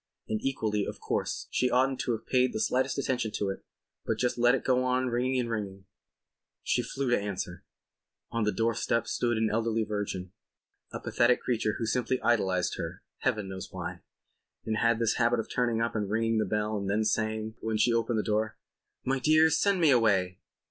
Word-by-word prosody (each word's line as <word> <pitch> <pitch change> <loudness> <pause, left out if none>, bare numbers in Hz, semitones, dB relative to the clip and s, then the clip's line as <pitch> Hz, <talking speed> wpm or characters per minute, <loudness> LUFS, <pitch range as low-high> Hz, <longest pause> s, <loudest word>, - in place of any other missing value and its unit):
And 110 -1 -2
equally, 110 -6 0
of - - -6
course, - - -2
she 125 - +2
oughtn't 130 +1 +2
to 120 - 0
have 110 - -5
paid 130 -1 +2
the - - -2
slightest 130 +3 +1
attention 125 -4 0
to 100 - -1
it 95 - -5 0.4
but 110 - -1
just 125 +2 0
let 120 +2 +5
it 135 - -3
go 130 -1 +2
on 130 0 +1
ringing 125 +2 0
and 120 - -1
ringing. 100 -4 -4 0.8
She 125 - +1
flew 130 +1 -2
to - - +4
answer. 95 -3 -5 0.7
On 115 -1 0
the 105 - +2
doorstep 115 0 0
there - - -18
stood 120 -2 0
an 110 0 +1
elderly 115 0 +1
virgin, 105 -4 -4 0.6
a - - -5
pathetic 120 +1 +2
creature 110 -3 0
who 115 - -2
simply 125 +2 0
idolized 95 -6 +1
her - - -6 0.2
(heaven 105 -2 0
knows 95 0 -7
why) 90 -1 -6 0.6
and 110 -1 -1
had 115 0 +3
this 115 -1 +1
habit 120 0 +3
of 115 - -3
turning 120 -2 +1
up 115 0 0
and 105 -2 -1
ringing 115 +1 +1
the 110 - +1
bell 105 0 -1
and 100 0 -3
then 105 +2 +2
saying, 110 0 -1
when 110 -1 -1
she 115 +2 +3
opened 115 0 +1
the 105 - +1
door: 110 +1 -1 0.5
"My 135 +1 +1
dear, 155 +3 +5
send 195 +4 +2
me 160 -4 +5
away!" 100 -7 +2
115 Hz, 200 wpm, -29 LUFS, 105-125 Hz, 0.8 s, let